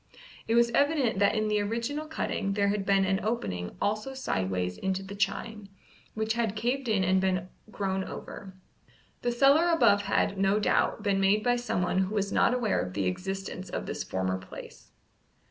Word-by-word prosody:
It 225 - +2
was 235 0 +4
evident 280 -6 +2
that 200 - +3
in 215 0 +1
the 210 -1 +1
original 235 +9 -3
cutting 200 -9 -2
there 200 0 +2
had 200 -1 -2
been 195 -1 +4
an 190 0 +1
opening 95 - -3
also 215 +6 -1
sideways 95 - -2
into 190 0 -1
the 195 +1 -8
chine, 205 0 -3 0.5
which 220 0 0
had 230 -3 -1
caved 245 +5 -1
in 210 -4 +2
and 185 +1 +3
been 185 -1 0 0.2
grown 190 -2 -2
over. 190 0 -8 0.7
The 240 - 0
cellar 280 +7 +4
above 205 -12 +4
had, 200 -1 0
no 195 +2 +3
doubt, 210 0 +1
been 200 -2 +1
made 200 +2 +3
by 245 0 +3
someone 185 -6 0
who 190 +3 -1
was 200 -1 0
not - - +3
aware 245 -4 +1
of 90 0 -6
the 100 -2 0
existence 190 - -4
of - - -4
this - - -4
former 95 0 -2
place. 95 - -11
200 Hz, 180 wpm, -28 LUFS, 190-230 Hz, 0.7 s, was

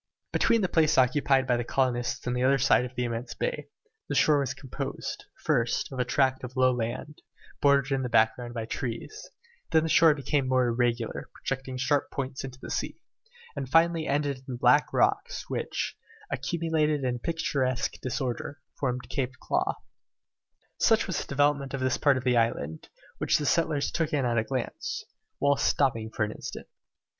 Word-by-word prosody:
Between 230 -1 +3
the 190 - +2
place 160 -2 +3
occupied 135 +1 +3
by 125 -2 +2
the 120 - -1
colonists 120 -1 -1
and 125 0 -1
the 125 - -1
other 135 +1 +4
side 125 -1 +4
of 125 0 -9
the 125 - -1
immense 115 0 -4
bay, - - -3 0.4
the - - -1
shore 150 -2 +4
was 130 -2 -2
composed, 130 -3 -5 0.2
first, 115 +2 +1
of 130 - -6
a 125 - +2
tract 130 0 +1
of 125 +1 -7
low 130 -1 +4
land, 125 +5 -4 0.4
bordered 140 -1 +4
in 135 - 0
the 125 - -2
background 120 +2 +2
by 115 -1 -3
trees; 120 - -5 0.4
then 160 -1 +4
the 160 - -1
shore 160 -1 +6
became 140 -1 0
more 130 -1 +3
irregular, 120 -1 -1
projecting 135 -1 -4
sharp 140 +2 +1
points 135 -1 -4
into 130 -1 -7
the - - -8
sea, - - -3 0.6
and 135 -2 -4
finally 165 +1 +3
ended 145 -1 0
in 130 - -19
the - - -7
black 125 +4 +4
rocks - - +1
which, - - -2 0.4
accumulated 155 -4 0
in 125 -1 -1
picturesque 130 -4 -1
disorder, 130 +2 -3 0.2
formed 125 -2 -2
Claw 130 -1 -1
Cape. - - -30 0.9
Such - - +4
was - - -2
the - - -8
development 140 -1 +1
of - - -4
this 130 -1 +1
part 140 -3 +4
of 130 - -4
the 125 -2 +3
island, 80 -9 -1 0.3
which - - +3
the 150 - -3
settlers 160 -2 +1
took 165 -3 -1
in 140 -3 +1
at 120 -2 +2
a - - 0
glance, 130 +1 -4 0.3
whilst 140 0 +2
stopping 115 -6 +1
for 110 - -1
an 105 - -1
instant. - - -7
130 Hz, 180 wpm, -28 LUFS, 125-145 Hz, 0.9 s, shore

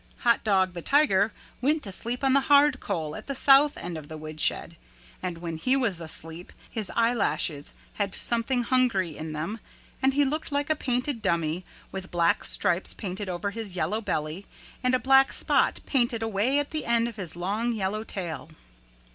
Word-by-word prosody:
Hot 235 -1 +3
Dog 190 -3 +2
the 175 - -6
Tiger 225 - +3 0.3
went 300 +4 +1
to 200 - -3
sleep 240 +7 -3
on 265 -1 +3
the 275 - +6
hard 285 -2 +6
coal 155 -2 -3
at - - -9
the 275 - -3
south 280 +2 +5
end 170 -2 -5
of 150 - -12
the 155 - -7
woodshed 155 +2 -1 0.5
and 180 -2 -3
when 165 -1 -5
he 255 +11 +2
was 205 -10 +1
asleep 165 +1 -7 0.2
his 215 -4 -2
eyelashes 230 -10 +1 0.3
had 200 -1 0
something 240 +1 +1
hungry 230 - +1
in 155 0 -6
them 165 +9 -4 0.4
and 265 0 +2
he 290 0 +4
looked 305 +3 -3
like 285 +2 0
a - - +3
painted 250 -2 -1
dummy 170 0 0 0.3
with 190 -1 -6
black 170 -2 +2
stripes 175 +2 +2
painted 195 0 -5
over 185 +3 -2
his 210 -3 -6
yellow 210 +5 -1
belly 155 -1 -3 0.4
and 255 0 +3
a - - +1
black 270 +1 +5
spot - - +1
painted 240 -4 +1
away 225 +5 +1
at 290 0 -1
the 310 -2 -3
end 235 0 +3
of 230 -2 -8
his 180 -6 -6
long 205 +7 -1
yellow 215 -1 -2
tail. 175 -7 -6
215 Hz, 185 wpm, -27 LUFS, 175-255 Hz, 0.5 s, the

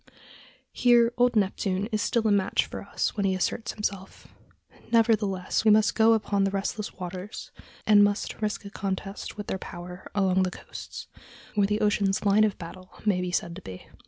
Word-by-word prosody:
Here 240 -1 +4
Old 245 0 +3
Neptune 195 -1 0
is 215 -1 0
still 230 -1 +1
a - - +3
match 200 -2 +2
for - - -7
us - - -2
when 205 - -1
he 190 -1 +2
asserts 205 +4 -2
himself. 200 -3 -5 0.6
Nevertheless, 215 -6 +2
we 220 - +5
must 215 0 +5
go 225 0 +5
upon 205 -2 +1
the 195 - +2
restless 200 +2 -3
waters, 185 +3 -7 0.3
and 205 -1 +7
must 205 +2 -1
risk 210 -1 -2
a 200 - -8
contest 195 +2 -5
with 210 - -5
their 190 - -3
power 180 0 -9
along 190 -2 +3
the 185 - +1
coasts, - - -9 0.5
where 205 -2 +3
the 210 +1 -1
ocean's 205 -1 +1
line 205 +2 +5
of 210 - -1
battle 185 +2 -10 0.2
may 195 -4 +2
be 180 - -2
said 170 -1 -1
to - - -9
be. 95 -1 -10
200 Hz, 185 wpm, -27 LUFS, 190-215 Hz, 0.6 s, and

